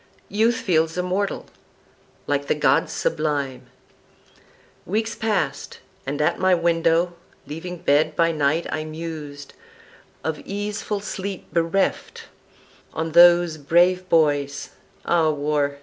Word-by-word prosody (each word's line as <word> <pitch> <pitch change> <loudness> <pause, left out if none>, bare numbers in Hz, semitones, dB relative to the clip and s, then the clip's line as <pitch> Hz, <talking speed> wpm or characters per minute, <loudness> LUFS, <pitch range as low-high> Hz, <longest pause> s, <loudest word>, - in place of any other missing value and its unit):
Youth 225 +3 +2
feels 165 -5 0
immortal, 185 +3 -1 0.8
like 145 -1 -1
the - - +1
gods 150 - +2
sublime. 140 -4 -2 1.2
Weeks 220 +4 -2
passed; 195 -11 -2 0.3
and 145 +2 -3
at 150 - +1
my 185 -1 +4
window, 170 0 +2 0.3
leaving 165 +5 -7
bed, 155 -2 +2
By 165 +1 +3
night 155 +1 0
I 155 - -2
mused, 155 -3 -7 0.7
of 160 -1 -2
easeful 205 +1 -4
sleep 195 -2 -6
bereft, 170 +3 0 0.7
On 160 +1 -2
those 175 -1 +6
brave 180 +5 +2
boys 145 -3 +1 0.3
(Ah 165 -2 +3
War! 145 -1 -1
165 Hz, 110 wpm, -23 LUFS, 150-180 Hz, 1.2 s, those